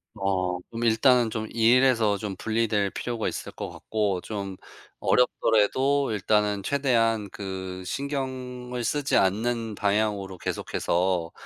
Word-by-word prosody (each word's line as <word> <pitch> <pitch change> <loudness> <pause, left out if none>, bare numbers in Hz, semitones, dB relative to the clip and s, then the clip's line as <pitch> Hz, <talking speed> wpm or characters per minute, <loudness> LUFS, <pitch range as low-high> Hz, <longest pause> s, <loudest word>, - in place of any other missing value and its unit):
어 95 -3 -1
좀 115 0 -4
일단은 120 +1 +4
좀 110 0 -3
일에서 115 -2 +4
좀 100 -1 -5
분리될 110 -1 0
필요가 120 -2 -3
있을 - - -4
것 - - -6
같고 105 -4 -2
좀 100 -2 -5 0.4
어렵더라도 125 +4 +2
일단은 105 0 +1
최대한 115 -6 +1
그 95 -2 -6
신경을 130 -2 -4
쓰지 145 +4 +1
않는 110 +3 0
방향으로 100 -2 0
계속해서 85 0 -1
110 Hz, 255 characters per minute, -26 LUFS, 100-125 Hz, 0.4 s, 일단은